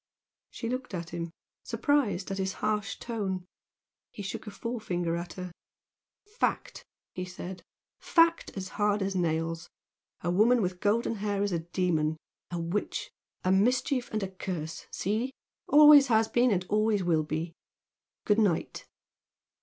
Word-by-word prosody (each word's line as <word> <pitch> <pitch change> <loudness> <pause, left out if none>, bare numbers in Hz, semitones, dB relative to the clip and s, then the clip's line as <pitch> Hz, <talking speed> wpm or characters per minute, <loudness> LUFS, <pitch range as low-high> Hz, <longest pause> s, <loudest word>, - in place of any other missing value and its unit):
She 230 - -5
looked 250 -3 -3
at 170 -2 -5
him, 170 0 -4 0.3
surprised 250 - +1
at 195 - -3
his 190 0 -1
harsh 210 -1 -1
tone. 195 -6 -3 0.6
He 205 - -8
shook 195 - -5
his 205 -2 -9
forefinger 180 -8 -2
at 175 +1 -5
her. 180 -1 -6 0.7
"Fact!" 420 +3 -2 0.3
he 180 - -4
said 180 0 -7 0.4
"Fact 335 -1 +3
as 190 -1 -4
hard 205 0 +1
as 195 0 -2
nails! 165 -1 -1 0.5
A 175 - 0
woman 225 +7 +5
with 180 -3 -1
golden 225 +3 +1
hair 205 -1 -1
is 205 - 0
a 170 - 0
demon 165 -2 0 0.3
a 175 - -3
witch 170 +5 -2 0.3
a 185 - +2
mischief 250 +6 +2
and 215 -2 -1
a 190 - -4
curse! 175 -4 -5
See? 220 +7 -1 0.3
Always 295 -1 +9
has 225 -2 +4
been 245 +2 +3
and 185 -4 +1
always 215 -1 +2
will 165 -3 +3
be! 160 +2 -3 0.7
Good 210 +1 +3
night!" 195 -7 0
195 Hz, 145 wpm, -29 LUFS, 175-225 Hz, 0.7 s, Always